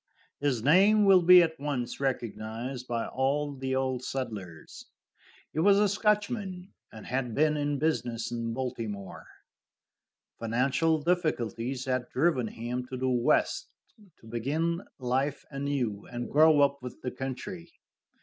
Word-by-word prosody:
His 135 -6 0
name 200 - +5
will 190 -2 +7
be 180 +1 +8
at 160 -2 -3
once 140 -4 -3
recognized 125 -1 -3
by 115 -1 -2
all 140 +3 -1
the 130 -1 -3
old 130 -1 -1
settlers. 105 -12 -6 0.7
He 155 - -2
was 200 +4 +5
a 210 0 +4
Scotchman, 205 -2 -1 0.2
and 110 - -11
had 125 -2 -2
been 155 +1 +3
in 145 -1 -1
business 120 -7 -1
in 115 -1 -3
Baltimore. 115 -6 -5 1.1
Financial 135 +8 +1
difficulties 130 - -1
had 130 -2 -1
driven 135 -5 +1
him 120 +3 -4
to 130 - -6
the 130 +1 0
West, 125 - +1 0.5
to - - -17
begin 150 - -1 0.2
life 130 +3 -1
anew 135 -7 -2
and 120 0 -5
grow 155 0 +6
up 140 -1 +2
with 125 0 -8
the 125 - -2
country. 165 +7 -6
135 Hz, 135 wpm, -29 LUFS, 120-160 Hz, 1.1 s, be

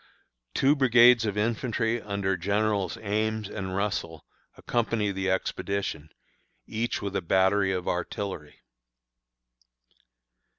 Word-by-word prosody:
Two 140 +2 +4
brigades 120 -3 +6
of 105 0 -2
infantry 115 +1 0
under 100 -2 -1
Generals 100 0 0
Ames 110 0 -1
and 95 -2 -5
Russell 95 -5 -3 0.3
accompany 115 -3 -1
the 95 0 -2
expedition, 95 -3 -2 0.6
each 115 0 -3
with 100 -1 -4
a - - 0
battery 95 +2 +2
of 90 -1 -3
artillery. 90 -3 -4
100 Hz, 100 wpm, -27 LUFS, 95-110 Hz, 0.6 s, brigades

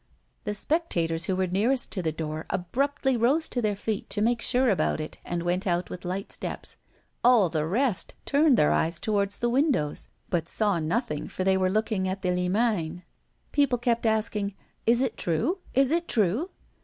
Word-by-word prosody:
The 210 - -2
spectators 175 - 0
who 190 - 0
were 185 0 +1
nearest 220 +8 +1
to 190 - -2
the 160 -2 0
door 155 0 -5
abruptly 265 +9 0
rose 265 +8 +2
to 245 - -2
their 210 -2 0
feet 205 +1 -3
to 205 - -1
make 230 +1 +1
sure 255 +2 +2
about 195 -7 +1
it, 155 - -6
and 175 -1 -3
went 180 +3 -1
out 175 0 0
with 180 - -7
light 185 +2 -4
steps. - - -4 0.5
All 235 -7 +5
the 155 -1 -1
rest 225 +2 0
turned 285 -2 +4
their 150 - +4
eyes 165 +1 +1
toward 200 -2 +1
the 220 +4 -2
windows, 250 - +1 0.2
but 170 -2 0
saw 205 -5 +1
nothing, 165 - -2
for 185 - -4
they 190 0 +3
were 185 -1 +2
looking 215 -1 0
at 190 +1 -3
the 180 - +1
Limagne. 180 -2 0 0.5
People 280 -4 +2
kept 235 -1 0
asking: 210 -2 0 0.3
"Is 235 +2 +4
it 260 -4 -1
true? 235 - 0 0.2
Is 270 +1 +4
it 340 +1 +1
true?" 220 - +1
205 Hz, 185 wpm, -27 LUFS, 180-245 Hz, 0.5 s, All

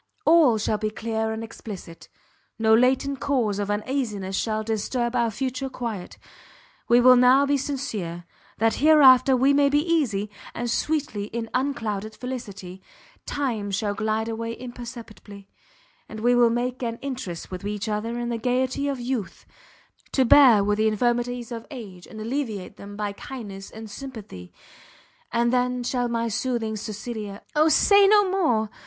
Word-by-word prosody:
All 310 -8 +5
shall 215 0 -1
be 215 0 -1
clear 220 0 -2
and 220 0 -4
explicit; 200 -6 -10 0.5
no 220 0 +3
latent 260 +3 +2
cause 235 -7 0
of 205 0 -2
uneasiness 210 -3 -2
shall 215 +1 -1
disturb 235 +3 -2
our 235 -1 +2
future 260 +4 -3
quiet; 230 -8 -6 0.7
we 240 +1 +6
will 255 +1 +7
now 250 +3 +5
be 285 0 +2
sincere, 220 -12 -4 0.3
that 225 +1 +1
hereafter 270 -4 +7
we 270 +3 +4
may 280 0 +4
be 290 - +2
easy; 220 -12 0 0.2
and 240 0 -2
sweetly 285 -9 -1
in 225 +1 -5
unclouded 220 -6 -2
felicity, 200 -8 -7 0.5
time 235 -8 -2
shall 205 +1 -1
glide 220 +1 -1
away 230 0 -4
imperceptibly, 235 -5 -10 0.6
and 215 - -7
we 245 +2 +3
will 240 -1 +5
make 245 +2 -2
an 230 -2 -3
interest 245 -13 -5
with 185 +1 -6
each 205 +1 -3
other 220 +3 -2
in 240 0 -3
the 235 -1 -2
gaiety 255 +4 0
of 275 -2 -2
youth, 240 -4 -4 0.7
to 265 - +3
bear 240 -5 +7
with 210 +1 0
the 220 - +3
infirmities 240 +2 -1
of 230 -1 -6
age, 205 - -10
and 220 - -10
alleviate 220 -5 -4
them 205 0 -10
by 210 -1 -2
kindness 200 -6 -8
and 220 0 -9
sympathy. 205 - -9 0.8
And 235 +1 +1
then 250 0 +1
shall 245 0 -1
my 230 -1 -1
soothing 230 -1 -2
Cecilia 210 -1 -6
" - - -38
"O 310 +1 +4
say 400 +6 +6
no 410 -1 +5
more!" 240 - +1
235 Hz, 160 wpm, -24 LUFS, 210-255 Hz, 0.8 s, will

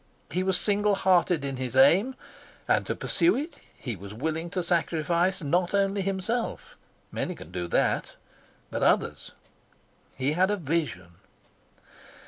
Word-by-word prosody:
He 180 +4 0
was 190 -1 +3
single 205 0 +2
hearted 180 -5 +2
in 135 -1 -3
his 130 -1 -4
aim, 185 - +5 0.5
and - - +2
to - - -1
pursue 340 +2 +2
it 300 +6 -5 0.2
he 120 -4 -4
was 100 +2 -10
willing 160 +6 -3
to 180 0 -2
sacrifice 170 +1 +1
not 175 +6 +1
only 195 0 +1
himself 195 +5 -3 0.4
many - - -3
can 80 - -12
do 90 -1 -3
that - - 0 0.6
but - - -3
others. - - +1 0.8
He 135 +3 0
had 185 +4 +3
a 205 - +1
vision. 150 - -3
175 Hz, 140 wpm, -27 LUFS, 140-195 Hz, 0.8 s, aim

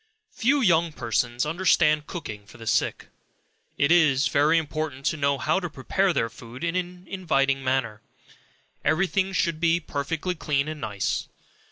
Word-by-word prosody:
Few 270 +5 +2
young 170 -6 +3
persons 120 0 -1
understand 155 -2 +2
cooking 105 - -7
for - - -14
the 115 - -10
sick. - - 0 0.7
It 140 +3 +2
is 150 -6 +4
very 150 +3 +3
important 155 -3 -3
to - - +1
know 140 -1 +1
how 155 +8 +1
to 175 -2 -4
prepare 180 +7 0
their 125 -8 0
food 115 +4 -11
in 170 0 -1
an 180 0 -4
inviting 140 -8 0
manner; 130 -5 -1 0.8
every 160 +5 +2
thing 190 +1 0
should 170 -3 0
be 170 0 +3
perfectly 160 +3 -3
clean 150 -4 -1
and 155 -1 -6
nice. 100 -2 -2
155 Hz, 160 wpm, -25 LUFS, 135-175 Hz, 0.8 s, is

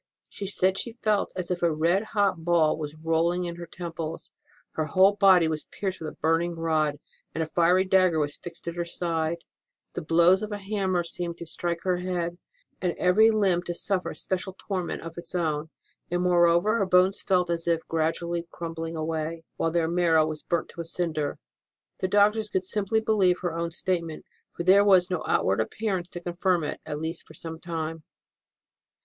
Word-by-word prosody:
She 200 - -6
said 190 0 +1
she 235 - -3
felt 210 -2 +1
as 180 -1 -4
if 175 - -2
a 170 -1 +3
red 165 +5 +2
hot 195 -5 +2
ball 165 -2 +3
was 150 -1 -6
rolling 165 +3 0
in 170 -1 -5
her 170 0 -8
temples, 165 -2 -6 0.4
her 155 - -2
whole 190 +6 +5
body 190 -5 +5
was 155 -1 -2
pierced 190 -3 -4
with 155 - -3
a - - -15
burning 165 +2 +1
rod, 155 -3 0 0.4
and 160 - 0
a - - -2
fiery 175 +3 +3
dagger 185 -3 +3
was 145 -1 -1
fixed 170 -1 -11
in 170 - -2
her 175 - -3
left 170 - -4
side; 165 -1 -1 0.6
the - - -4
blows 170 +4 +4
of 215 0 -4
a 205 - -2
hammer 195 -3 -1
seemed 170 0 -4
to 170 - -7
strike 170 +1 -3
her 185 -1 +1
head, 175 -1 -3 0.4
and 180 -2 0
every 205 +5 +5
limb 195 -5 +2
to 175 0 -5
suffer 185 +1 0
a - - -7
special 190 0 -3
torment 185 -4 -4
of 165 +1 -7
its 170 +1 -7
own; 160 -3 -1 0.4
and, 175 +1 0
moreover, 175 +5 +4
her 195 - +2
bones 185 +1 +4
felt 180 -3 +1
as 170 0 -2
if 165 -1 0
gradually 165 +1 -1
crumbling 165 0 -5
away, 160 +1 -3
while 165 - +1
their 165 0 +1
marrow 165 -2 +3
was 155 -1 -5
burnt 170 -1 -2
to 170 - -7
a - - -4
cinder. 160 -3 -2 0.6
The 185 - 0
doctors 210 +2 +3
could 190 - 0
simply 210 +3 0
believe 195 -5 +2
her 175 -2 -2
own 170 0 -2
statement, 170 -2 -3 0.3
for 170 - -5
there 190 +3 +6
was 185 -2 +5
no 180 -3 -1
outward 95 +3 +2
appearance 185 - -2
to 175 - -7
confirm 175 0 0
it, 150 - -4
at 150 - -3
least 160 +1 -3
for 155 - -14
some 160 +1 -7
time. 165 -2 -4
175 Hz, 195 wpm, -26 LUFS, 165-185 Hz, 0.6 s, there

